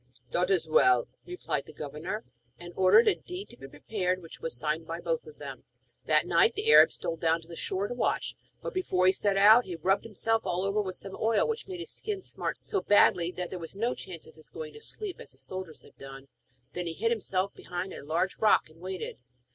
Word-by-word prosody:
'It 180 +1 +1
is 180 -4 +2
well,' 125 -5 +4 0.2
replied 360 +1 -3
the - - -10
governor; 155 +8 -5 0.3
and 175 0 -10
ordered 190 - +6
a 420 - +6
deed 360 +2 -7
to - - -13
be 135 - -11
prepared, 185 +4 -2
which 165 -3 -12
was 485 0 -3
signed - - -1
by - - -4
both 485 -1 -2
of 455 - -12
them. - - -8 0.4
That - - +4
night - - +4
the 430 +2 +2
Arab - - +9
stole 165 - -3
down 165 +1 +2
to 165 - -16
the 170 - -9
shore 190 +4 -2
to - - -4
watch, 245 - -1 0.3
but, - - -4
before 190 - +1
he 185 - +7
set 195 +1 0
out, 215 +5 +7
he 180 - -5
rubbed 190 +5 +1
himself 225 +1 0
all 180 +2 -1
over 195 +2 +1
with 185 -2 -4
some 195 0 -7
oil 225 -1 +2
which 455 -2 -3
made 365 -3 -6
his - - -5
skin 405 -3 -4
smart - - -3
so 395 - -2
badly 180 -4 +4
that 180 -1 -5
there 185 - -4
was 165 +2 -7
no 235 +5 0
chance 175 -4 -9
of 160 - -15
his 155 0 -13
going 155 -1 -7
to 225 - -12
sleep 410 - -6
as - - -7
the - - -20
soldiers 185 -4 -7
had - - -18
done. 135 0 -10 0.4
Then 175 0 -3
he 165 - -2
hid 230 +7 0
himself 195 -4 -1
behind 180 +1 -5
a - - -8
large 165 +6 -1
rock 215 -7 +4
and 160 - -20
waited. 185 -5 -5
190 Hz, 235 wpm, -29 LUFS, 170-230 Hz, 0.4 s, Arab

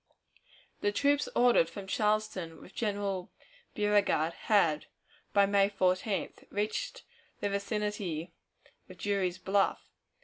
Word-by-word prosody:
The 205 - +1
troops 285 +6 +2
ordered 240 -9 +5
from 195 +3 -8
Charleston 210 -5 -1
with 185 - -14
General 200 -4 -2 0.4
Beauregard 205 -6 +2
had, 165 -9 +2 0.4
by 200 0 +5
May 200 0 +3
14th, 190 +1 -1
reached 215 - -2 0.4
the 205 - -1
vicinity 200 -5 -2 0.6
of - - -11
Drury's 195 -3 0
Bluff. 195 +1 0
200 Hz, 105 wpm, -31 LUFS, 185-210 Hz, 0.6 s, ordered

